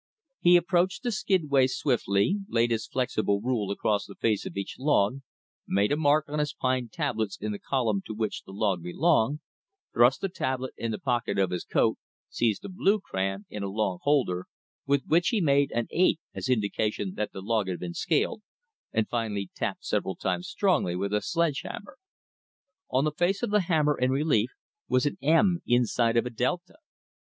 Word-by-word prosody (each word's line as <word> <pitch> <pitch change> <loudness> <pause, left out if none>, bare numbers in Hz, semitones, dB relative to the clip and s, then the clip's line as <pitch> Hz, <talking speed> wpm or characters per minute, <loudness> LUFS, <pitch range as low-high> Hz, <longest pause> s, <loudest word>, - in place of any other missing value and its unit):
He 175 0 +6
approached 180 +3 +1
the 245 - 0
skidway 155 - +2
swiftly, 125 - +1
laid 120 0 +2
his 110 -1 -1
flexible 110 -5 0
rule 110 -3 -1
across 100 +1 0
the - - -11
face 110 -3 0
of - - -8
each 100 - -5
log, 130 -4 +2 0.5
made 100 +4 +2
a - - +3
mark 150 0 +3
on 150 +1 -3
his 150 -1 -1
pine 130 -2 -1
tablets 110 - -2
in 105 +1 -3
the 100 - -5
column 115 -7 0
to 110 - -5
which 110 -1 -2
the - - -13
log 100 -3 0
belonged, 145 - +1 0.5
thrust 120 +3 +4
the 195 - 0
tablet 130 -7 -3
in 115 - -3
the 110 - -2
pocket 125 -3 -1
of 95 -2 +2
his 90 -1 -2
coat, - - +1 0.3
seized 115 -4 0
a - - -4
blue 200 +2 +2
crayon, 95 - -3
in 105 - -7
a 100 - -2
long 95 -3 -1
holder, 130 -12 +1 0.4
with 140 -1 +2
which 170 +3 +3
he 225 - +2
made 140 -4 +3
an 120 0 -1
8 175 -2 +3
as - - -4
indication 105 -3 0
that 105 - -3
the 95 - -7
log 110 -1 0
had 90 -2 -3
been 85 -1 -5
scaled, 165 - 0 0.5
and 110 -1 0
finally 105 -5 -3
tapped - - -3
several 95 - -1
times 175 - -2
strongly 185 - +1
with 100 +2 -2
a 105 - +2
sledge 170 - 0
hammer. 205 - -9 0.9
On 130 +2 +2
the 155 - +1
face 175 +7 0
of 240 - -1
the 210 - +4
hammer 155 -4 +2
in 125 +1 +2
relief 135 -4 +2 0.4
was 130 +1 +2
an 145 - -2
M 170 +4 +3
inside 120 -1 +2
of 115 - +3
a 125 - -4
delta. 150 - -2
125 Hz, 190 wpm, -27 LUFS, 105-155 Hz, 0.9 s, He